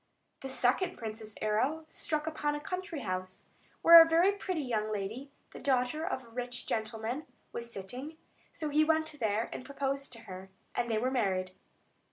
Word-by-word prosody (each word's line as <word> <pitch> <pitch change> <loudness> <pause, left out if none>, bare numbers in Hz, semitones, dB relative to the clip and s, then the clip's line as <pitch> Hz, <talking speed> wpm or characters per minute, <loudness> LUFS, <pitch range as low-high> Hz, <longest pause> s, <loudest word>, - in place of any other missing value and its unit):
The 270 - -6
second 265 +9 +1
prince's 220 -1 -7
arrow 260 +10 +1
struck 305 -1 -2
upon 300 -2 -1
a - - -3
country 365 -1 -4
house, 185 -2 -4 0.4
where 335 0 +12
a 330 - +5
very 340 +4 +5
pretty 375 -5 -2
young 215 -4 -1
lady, 215 +7 -4 0.2
the - - -9
daughter 260 +3 +1
of 330 -7 -2
a 235 - -16
rich 245 +1 -4
gentleman, 225 +5 -2 0.2
was 235 0 -6
sitting; 250 +11 -7 0.3
so 310 - -4
he 300 +1 +4
went 315 -1 +1
there, 220 0 +1
and - - -6
proposed 275 0 -2
to 230 - -8
her, 190 -1 -9 0.2
and 240 0 -1
they 220 - +1
were 250 +4 +1
married. 185 -7 0
255 Hz, 175 wpm, -32 LUFS, 220-310 Hz, 0.4 s, where